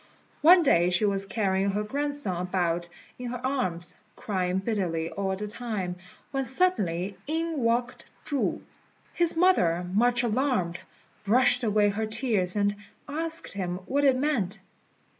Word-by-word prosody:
One 345 +3 +7
day 175 - +4
she 180 +4 +2
was 195 -1 0
carrying 195 -1 0
her 205 +2 -1
grandson 285 -6 -2
about 175 -2 -1 0.3
in 250 -1 -4
her 250 +1 -5
arms, 180 - -1 0.2
crying 185 -3 -1
bitterly 185 -6 -2
all 195 -1 -2
the 210 +2 -5
time, 210 -5 -4 0.3
when 270 -1 -1
suddenly 200 - 0
in 325 0 -1
walked 240 +1 0 0.2
Chu. 285 -3 -1 0.5
His 340 -1 +1
mother, 180 - +3
much 245 +3 +3
alarmed, 225 -8 0 0.4
brushed 245 +4 +4
away 210 -2 +3
her 215 +2 -2
tears, 215 -5 0
and 205 0 +1 0.3
asked 320 +3 -3
him 180 -3 -3
what 285 +1 0
it 270 -2 +4
meant. 245 -9 0
210 Hz, 140 wpm, -27 LUFS, 185-265 Hz, 0.5 s, One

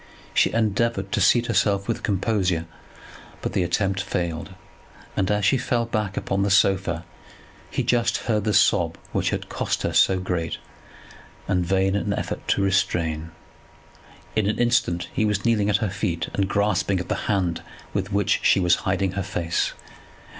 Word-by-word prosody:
She - - +3
endeavoured 110 -2 0
to - - 0
seat 120 -1 +4
herself 100 -4 +1
with 115 - -2
composure; 95 -5 0 0.8
but - - -2
the - - +1
attempt 95 +2 0
failed, 85 -1 -3 0.6
and 95 -1 0
as 105 -1 +1
she 130 +6 +3
fell 120 -1 0
back 105 -4 -2
upon 95 0 -1
the 100 - +1
sofa 95 -3 +2 0.6
he - - -1
just 120 -1 +2
heard 105 -3 +1
the 105 - +1
sob 85 -5 +3
which - - 0
had - - -3
cost - - -2
her - - -1
so 95 -1 +4
great 90 -3 -2 0.9
and 90 -2 +1
vain 95 +2 +1
an 100 0 0
effort - - -4
to 100 - +2
restrain. 80 -5 0 1.1
In 110 -2 +2
an 105 - -1
instant 120 -8 +1
he - - +1
was 105 -1 0
kneeling 105 -3 +2
at 100 - +3
her 95 - -2
feet, 95 -4 -2
and 100 -1 0
grasping 100 -2 +1
at 90 - -5
the - - -3
hand 90 -5 0 0.3
with 100 +1 -2
which 100 +1 +2
she - - +4
was 90 -2 +3
hiding 95 0 +1
her 100 +2 -3
face. 85 -2 -1
100 Hz, 170 wpm, -24 LUFS, 90-105 Hz, 1.1 s, seat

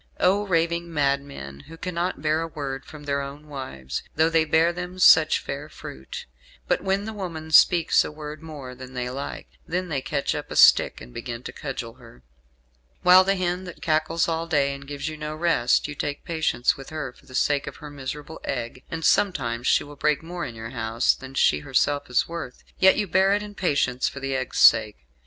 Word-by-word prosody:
Oh, 200 +3 +2
raving 170 -1 0
madmen! 140 - -2
who 165 - -11
cannot 175 -3 -3
bear 155 +1 +2
a 165 - -3
word 140 -4 -5
from 150 -1 -11
their 140 -1 -1
own 140 +2 -8
wives, 65 - -6
though 160 +2 +3
they 165 -1 +3
bear 160 +2 +3
them 180 +1 -6
such 160 -3 +7
fair 145 +2 -6
fruit; 65 - -9 0.4
but - - +1
when 195 +1 0
the 220 - -5
woman 165 -6 -6
speaks 170 +1 +6
a - - -6
word 150 0 -8
more 145 -6 -8
than 130 0 -11
they 125 0 -3
like, 140 +2 -6 0.2
then 180 +1 -2
they 140 -4 -1
catch 140 +1 -1
up - - -5
a - - -6
stick, - - +6
and - - -12
begin 120 - -6
to - - -7
cudgel 130 -5 -6
her; 115 - -16 0.8
while 180 +1 +8
the 195 +1 +1
hen 180 0 -2
that 180 - -10
cackles 160 +1 +1
all 165 0 -2
day, 140 -4 +2
and 140 0 -10
gives 145 +1 -5
you 155 0 -5
no 150 0 -5
rest, 155 -8 +2
you 150 - -6
take 145 0 -4
patience 160 -7 +1
with 135 - -10
her 155 -5 -5
for - - -23
the 130 - -10
sake 145 +1 +1
of - - -6
her 150 -1 -10
miserable 145 +3 -7
egg 120 0 -4
and 165 -1 -4
sometimes 120 -11 +1
she - - +4
will 145 0 -11
break 150 +1 +1
more 175 +1 -5
in 120 - -7
your 115 +1 -7
house 115 -1 +1
than 130 0 -11
she - - +3
herself 145 +1 0
is 125 - +2
worth, 165 -7 -7 0.2
yet 190 0 +6
you 210 - +1
bear 190 +2 +3
it 210 - -2
in 210 0 -9
patience 140 -9 0
for 140 - -8
the 135 0 -2
egg's 130 -1 -3
sake. 110 -2 +6
150 Hz, 210 wpm, -24 LUFS, 130-170 Hz, 0.8 s, while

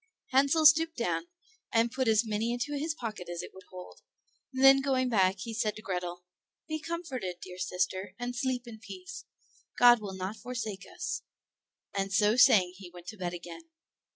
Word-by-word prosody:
Hansel 280 +4 +4
stooped 320 +2 +6
down, 240 +7 -1 0.4
and 230 +1 +2
put 260 0 -1
as 220 +1 +4
many 220 +2 -1
into 245 +5 -2
his 305 +2 -2
pocket 215 - -6
as 175 -1 -4
it - - -9
would 190 0 -14
hold, 180 -1 -11 0.5
and 260 0 -2
then 270 0 +8
going 260 -2 +1
back 190 -4 +3
he 230 +3 -5
said 215 -1 -1
to 215 - -10
Grethel, 180 -1 -4 0.4
"Be 310 -1 -3
comforted, 295 - -4
dear 180 0 -10
sister, 185 +1 -2
and 245 0 -4
sleep 250 0 -1
in 225 -2 -10
peace; 375 - -9 0.5
God 240 -2 +7
will 195 -2 -6
not 190 +3 -4
forsake 230 -5 -5
us;" 360 0 -4 0.7
and 195 -1 -2
so 210 +2 +3
saying 190 -7 +6
he 190 -2 -10
went 175 0 -13
to 215 - -9
bed 175 -2 -3
again. 175 - -10
225 Hz, 180 wpm, -30 LUFS, 190-265 Hz, 0.7 s, then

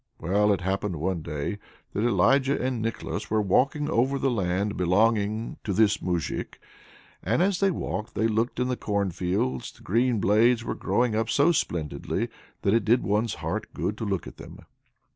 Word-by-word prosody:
Well, 100 +5 +2
it 95 -3 0
happened 95 0 -1
one 85 +2 -2
day 75 +6 -4 0.3
that 105 - -1
Elijah 135 +3 +3
and 125 -3 -1
Nicholas 115 +1 -4
were 110 - +2
walking 135 - +2
over 135 -1 +1
the 135 -1 +1
land 100 -1 -1
belonging 105 +4 +1
to 100 - -2
this 105 +1 +3
Moujik; 85 -4 -3 0.6
and 115 - +1
as 190 -1 +1
they 195 - +3
walked 110 - -4
they 110 - +2
looked 115 +3 -1
in 125 - +1
the 125 - 0
cornfields 90 - -1
the - - -20
green 120 +3 +1
blades 115 +4 +3
were - - -3
growing 120 -2 0
up 110 +1 0
so 140 +9 +4
splendidly 85 - -2 0.3
that 100 - +3
it 115 -1 +3
did 120 +5 +3
one's 105 +3 0
heart - - -3
good 105 - -2
to - - -3
look 100 -4 -2
at - - -10
them. - - -11
110 Hz, 180 wpm, -26 LUFS, 95-120 Hz, 0.6 s, so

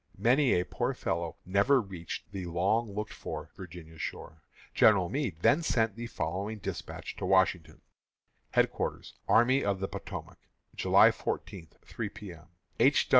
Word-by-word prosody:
Many 125 -3 +4
a 90 - -1
poor - - -2
fellow 85 0 -2
never 100 +9 +4
reached 95 -7 -7
the 95 -3 -5
long 100 +6 +1
looked 105 +1 -4
for - - -7
Virginia 85 -3 -10
shore. 80 0 -6 0.3
General 95 -5 +5
Meade 130 - -2
then 165 - +5
sent 115 - +1
the 120 +1 -5
following 100 +2 -3
despatch 100 - -6
to - - -3
Washington: 95 -3 +2 0.7
HEADQUARTERS - - 0
ARMY 130 +4 +4
OF 100 -1 0
THE 95 - -2
POTOMAC, - - -7 0.4
July - - +6
14, 95 -5 -5 0.2
3 - - -4
P. 100 -4 -9
M. 80 -1 -16 0.3
_H. 135 +5 +4
100 Hz, 145 wpm, -30 LUFS, 90-115 Hz, 0.7 s, July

